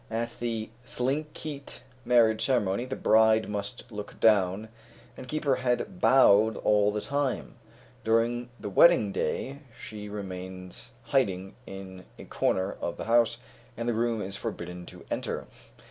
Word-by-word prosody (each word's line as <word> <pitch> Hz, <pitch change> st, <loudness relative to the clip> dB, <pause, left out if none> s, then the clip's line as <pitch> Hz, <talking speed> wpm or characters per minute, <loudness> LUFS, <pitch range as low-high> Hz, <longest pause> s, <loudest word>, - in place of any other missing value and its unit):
At 115 Hz, +1 st, -3 dB
the 115 Hz, -2 st, -3 dB
Thlinkeet 140 Hz, +1 st, -4 dB, 0.2 s
marriage 115 Hz, -2 st, +4 dB
ceremony, 120 Hz, -3 st, +1 dB
the 130 Hz, +1 st, -4 dB
bride 110 Hz, 0 st, +4 dB
must 105 Hz, +4 st, -5 dB
look 105 Hz, -1 st, -8 dB
down, 105 Hz, -1 st, +3 dB, 0.5 s
and -, -, -9 dB
keep 155 Hz, +2 st, -3 dB
her 135 Hz, -2 st, +3 dB
head 130 Hz, -, -1 dB
bowed 110 Hz, -6 st, +5 dB
all 105 Hz, -1 st, +3 dB
the 105 Hz, 0 st, -2 dB
time; 140 Hz, 0 st, -2 dB, 0.5 s
during 120 Hz, +2 st, +1 dB
the 105 Hz, -1 st, -5 dB
wedding 110 Hz, -, +6 dB
day, 135 Hz, +7 st, -2 dB, 0.2 s
she 105 Hz, -1 st, -8 dB
remains 95 Hz, +2 st, -7 dB
hiding 95 Hz, -9 st, 0 dB
in 95 Hz, -1 st, -9 dB
a -, -, -10 dB
corner 95 Hz, +1 st, 0 dB
of 85 Hz, -, -3 dB
the -, -, -5 dB
house, 115 Hz, 0 st, +3 dB, 0.4 s
and 115 Hz, +1 st, -3 dB
the 120 Hz, -, +2 dB
groom 115 Hz, -1 st, 0 dB
is 100 Hz, +1 st, -5 dB
forbidden 90 Hz, -5 st, -6 dB
to -, -, -12 dB
enter. -, -, -3 dB
110 Hz, 145 wpm, -28 LUFS, 100-125 Hz, 0.5 s, wedding